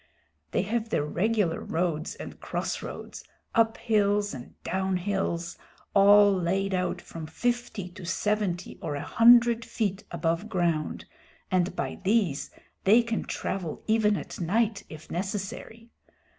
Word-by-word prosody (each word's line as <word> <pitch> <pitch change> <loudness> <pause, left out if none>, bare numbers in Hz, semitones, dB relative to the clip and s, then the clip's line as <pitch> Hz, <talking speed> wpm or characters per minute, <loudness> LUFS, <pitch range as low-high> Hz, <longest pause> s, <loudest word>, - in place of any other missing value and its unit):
They 180 - 0
have 225 +2 -2
their 150 - 0
regular 200 +1 +1
roads 165 -2 -2
and - - -9
crossroads, - - -5 0.3
up 225 -1 +3
hills 205 -2 +1
and 125 -2 -9
down 190 0 0
hills, 175 -3 -2 0.3
all 205 0 +7
laid 190 +2 0
out 180 -1 0
from 160 -2 -8
fifty 240 +1 -2
to 185 +1 -12
seventy 185 0 -1
or 150 -3 -3
a 145 - -4
hundred 235 0 +6
feet 205 -4 -2
above 170 +4 -1
ground, 170 -5 -1 0.5
and 185 0 +1
by - - -3
these 195 -8 +1 0.3
they 220 +5 +6
can 230 -1 -2
travel 180 -5 -4
even 215 -2 +3
at - - -7
night 210 +4 +1
if 155 0 -11
necessary. 205 +5 -5
195 Hz, 130 wpm, -27 LUFS, 175-220 Hz, 0.5 s, all